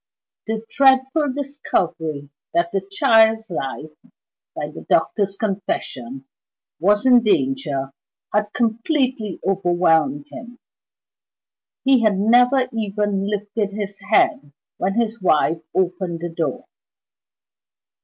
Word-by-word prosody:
The 220 0 -3
dreadful 270 +2 +3
discovery 170 - -3 0.2
that 170 0 +1
the 195 - -1
child's 220 +1 +3
life 150 0 -5 0.6
(by - - -4
the - - -10
doctor's 200 -2 +1
confession) 135 - -4 0.5
was 205 +6 +2
in 250 -2 +6
danger 215 - 0 0.4
had 210 0 0
completely 235 - -1
overwhelmed 170 -6 +1
him: 240 +1 -10 1.3
he 265 -2 +4
had 215 -3 +2
never 245 +5 +4
even 205 -2 -1
lifted 205 0 -2
his 205 -1 -5
head 145 - +2 0.3
when 195 +2 -1
his 230 -2 -1
wife 165 -2 +2
opened 180 -2 -1
the 175 - -3
door. 165 -5 -3
205 Hz, 105 wpm, -21 LUFS, 175-230 Hz, 1.3 s, in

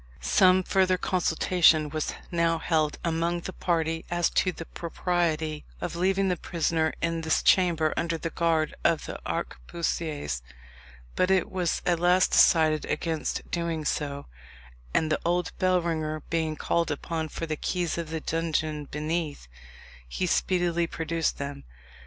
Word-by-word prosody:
Some 185 - +4
further 185 0 +2
consultation 170 -3 +3
was 155 0 -2 0.2
now 170 -1 +2
held 155 -2 0
among 170 +1 0
the 185 - -6
party 165 -2 -1
as 175 -1 +1
to 185 - +2
the 165 - -8
propriety 160 -3 -1 0.2
of - - -4
leaving 190 +2 +2
the 180 - +1
prisoner 160 -1 0
in 165 0 0
this 160 -1 +1
chamber 170 -4 +3
under 165 0 -1
the 165 0 -4
guard 165 -2 +1
of 165 - +2
the - - -6
arquebusiers, 145 - -3 0.7
but 185 - +2
it 190 -1 +2
was 180 -3 -1
at 175 -2 +2
last 180 +2 +4
decided 155 -2 +5
against 160 -2 -3
doing 170 -3 -2
so, 140 -2 -2 0.7
and 155 - +1
the - - +1
old 175 +1 0
bellringer 165 -4 0
being 160 -2 0
called 170 +2 0
upon 160 +2 -3
for 165 - -4
the 155 -1 -2
keys 175 +2 -2
of 165 -2 -4
the 160 0 -3
dungeon 155 -2 -1
beneath, 150 - -3 0.6
he 65 - -2
speedily 175 -2 +1
produced 165 0 -1
them. 140 0 -5
165 Hz, 145 wpm, -27 LUFS, 155-175 Hz, 0.7 s, decided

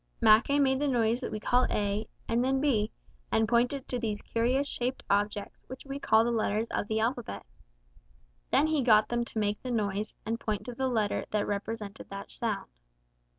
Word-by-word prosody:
Mackay 225 +5 +5
made 265 -2 +3
the 290 - +1
noise 235 -3 +2
that 255 - -5
we 215 - -3
call 245 +4 +2
A 205 +1 -1 0.2
and 235 +1 +1
then 265 +1 +2
B, 230 -7 +1 0.4
and 220 0 +3
pointed 245 +4 +1
to 250 - -2
these 215 -3 -3
curious 250 +5 +1
shaped 255 -1 -2
objects 205 0 -1
which 260 +2 -9
we 275 0 -5
call 220 -5 +4
the 240 - 0
letters 220 -1 0
of - - -1
the 220 +1 0
alphabet. 230 - -2 1.0
Then 280 +3 +4
he 310 -2 +1
got 215 -4 +5
them 240 0 0
to 230 - -6
make 210 -1 0
the 255 - -5
noise 210 -3 -1
and 225 +2 -2
point 210 -2 -3
to 245 - -5
the 265 +2 -1
letter 220 -5 0
that 210 -1 0
represented 205 +1 -4
that 200 0 -7
sound. 215 -4 -3
230 Hz, 195 wpm, -29 LUFS, 210-255 Hz, 1.0 s, Mackay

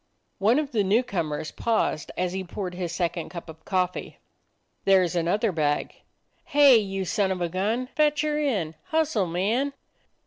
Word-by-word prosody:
One 215 +6 +4
of 300 -2 -1
the 215 -5 +2
new 210 +6 +3
comers 155 -9 -3
paused 220 -9 -1
as 180 0 -1
he 190 0 -3
poured 180 0 -5
his 175 -2 -4
second 175 -1 -2
cup 170 -1 -8
of 160 0 -12
coffee: 185 -2 -1 0.7
"There 190 -2 +5
's 175 - -6
another 185 +6 +1
bag." 150 -3 0 0.5
"Hey, 285 -4 +6
you 195 -3 -2
son 195 +2 +1
of 185 - -2
a 175 -1 -1
gun! 210 +8 -1
Fetch 295 +2 +1
her 300 -1 0
in. 205 - 0
Hustle, 310 - +1
man!" 220 +12 0
195 Hz, 170 wpm, -26 LUFS, 175-240 Hz, 0.7 s, Hey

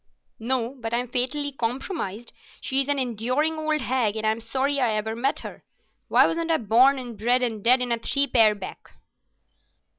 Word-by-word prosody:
"No, 240 +1 -1
but 225 0 -3
I'm 245 +1 -1
fatally 260 +4 0
compromised. 240 - -4 0.3
She's 270 0 +1
an 285 0 0
enduring 255 +6 -1
old 310 -1 -1
hag, 245 -5 0
and 220 0 -3
I'm 220 +1 0
sorry 270 +5 -1
I 240 -4 +1
ever 220 +1 -2
met 265 +5 -1
her. - - -10 0.4
Why - - +5
wasn't 335 0 -2
I 325 - +3
born 245 +5 +4
and 245 -3 -7
bred 245 +4 +1
and 225 -4 -3
dead 250 +2 +4
in 245 - -3
a 235 - 0
three 280 +4 0
pair 225 -6 +4
back?" 195 -2 -10
250 Hz, 180 wpm, -24 LUFS, 225-275 Hz, 0.4 s, Why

